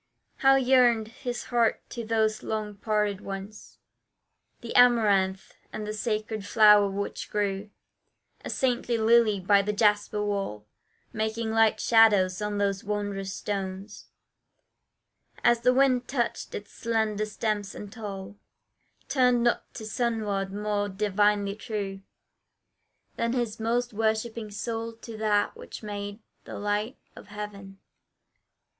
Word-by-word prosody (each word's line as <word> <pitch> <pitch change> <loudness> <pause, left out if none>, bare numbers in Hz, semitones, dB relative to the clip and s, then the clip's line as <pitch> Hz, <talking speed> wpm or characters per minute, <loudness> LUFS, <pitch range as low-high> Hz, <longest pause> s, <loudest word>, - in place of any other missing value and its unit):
How 270 -1 +5
yearned 245 -4 +4
his 245 +1 -5
heart 235 -2 0
to 235 - -5
those 220 -1 0
long 215 -1 -3
parted 210 -2 0
ones 195 +2 -8 0.8
The 235 - -7
amaranth, 205 -6 +4 0.2
and 215 - -5
the 210 - -4
sacred 215 -1 -2
flower 210 -1 +6
which 200 +1 -4
grew 205 0 -2 0.7
A - - -6
saintly 245 -2 0
lily 225 -2 +4
by 200 +2 +4
the 210 +1 -2
jasper 210 0 +2
wall, 195 - -3 0.5
Making 220 +1 -2
light 220 -1 +3
shadows 210 -5 +4
on 210 0 -2
those 200 -1 0
wondrous 200 -2 -3
stones, 195 +1 -5 1.4
As 240 -1 +4
the 250 - +4
wind 255 -1 +3
touched 245 -4 -2
its 205 - -7
slender 220 -2 -1
stems 210 -1 -2
and 205 -1 -8
tall, 200 -3 -7 0.7
Turned 250 -3 +3
not 240 - 0
to 220 - -7
sunward 215 -4 -1
more 205 0 -1
divinely 205 0 +1
true, 205 -3 -5 1.2
Than 230 +1 0
his 240 -4 -2
most 240 +1 -1
worshipping 220 +1 -1
soul 225 +2 -4
to 225 0 -10
that 210 -1 +1
which - - -10
made 205 +1 -6 0.2
The - - -7
light 210 +5 -2 0.2
of - - -12
heaven. 205 -2 -8
215 Hz, 125 wpm, -27 LUFS, 205-230 Hz, 1.4 s, flower